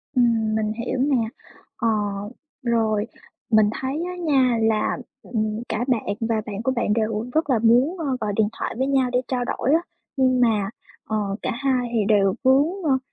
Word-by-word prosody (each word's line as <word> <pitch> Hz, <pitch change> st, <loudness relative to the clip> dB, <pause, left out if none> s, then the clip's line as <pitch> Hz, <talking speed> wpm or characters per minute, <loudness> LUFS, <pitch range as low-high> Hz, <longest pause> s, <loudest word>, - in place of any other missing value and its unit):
Ừm, 225 Hz, -3 st, +2 dB
mình 215 Hz, -1 st, 0 dB
hiểu 235 Hz, +2 st, -3 dB
nè. 275 Hz, -1 st, +2 dB, 0.6 s
Ờ, 230 Hz, -, 0 dB, 0.8 s
rồi. 225 Hz, -3 st, +1 dB, 0.5 s
Mình 215 Hz, -1 st, +5 dB
thấy 275 Hz, +5 st, -2 dB
á 360 Hz, -, -5 dB
nha, 270 Hz, -8 st, +2 dB
là, 220 Hz, -1 st, +1 dB, 0.3 s
ừm, 215 Hz, -2 st, -2 dB
cả 235 Hz, +3 st, -1 dB
bạn 220 Hz, -5 st, 0 dB
và 225 Hz, -1 st, 0 dB
bạn 210 Hz, 0 st, -5 dB
của 260 Hz, -, +1 dB
bạn 230 Hz, -3 st, +1 dB
đều 220 Hz, 0 st, -1 dB
rất 315 Hz, -2 st, +1 dB
là 245 Hz, -, +3 dB
muốn, 245 Hz, -, +3 dB
ơ, 320 Hz, -, -3 dB, 0.2 s
gọi 210 Hz, -1 st, -1 dB
điện 215 Hz, -1 st, +3 dB
thoại -, -, -3 dB
với 265 Hz, +2 st, 0 dB
nhau 265 Hz, -2 st, +2 dB
để 250 Hz, -, +2 dB
trao 250 Hz, -2 st, -1 dB
đổi 270 Hz, +4 st, 0 dB
á, 330 Hz, -, +4 dB, 0.4 s
nhưng 255 Hz, -1 st, +3 dB
mà, 215 Hz, -5 st, +2 dB, 0.4 s
ờ, 215 Hz, -, 0 dB, 0.2 s
cả 255 Hz, -, -1 dB
hai 255 Hz, -1 st, 0 dB
thì 215 Hz, -3 st, +2 dB
đều 200 Hz, -2 st, +3 dB
vướng, 270 Hz, +3 st, +5 dB, 0.2 s
ơ, 275 Hz, -4 st, +3 dB
235 Hz, 190 wpm, -23 LUFS, 215-260 Hz, 0.8 s, Mình